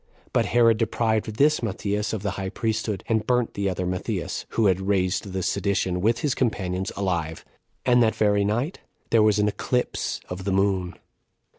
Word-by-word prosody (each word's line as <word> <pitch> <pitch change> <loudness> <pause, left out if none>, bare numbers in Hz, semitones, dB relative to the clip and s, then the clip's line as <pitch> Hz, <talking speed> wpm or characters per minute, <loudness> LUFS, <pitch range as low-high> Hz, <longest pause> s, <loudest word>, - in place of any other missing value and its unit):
But - - +2
Herod 115 -1 +4
deprived 110 -1 0
this 150 +5 +3
Matthias 105 -1 -2
of 110 -3 -4
the 100 - -1
high 95 0 -4
priesthood, 110 -2 -2
and 110 -1 0
burnt 125 -2 +1
the 100 -1 -1
other 90 0 -2
Matthias, 90 0 -3
who 115 - +4
had 95 -1 +3
raised 95 0 0
the 95 0 -2
sedition, 95 -2 0
with 115 +4 +2
his 145 -5 +1
companions, 95 -6 -1
alive. 85 -5 -2 0.4
And 125 -1 +5
that 110 -1 +3
very 105 -1 +2
night 120 - -1 0.3
there 115 - +5
was 105 -1 +4
an 105 0 +2
eclipse 125 +4 -1
of 90 +1 -6
the 100 - -1
moon. 95 -2 +1
105 Hz, 175 wpm, -25 LUFS, 95-115 Hz, 0.4 s, And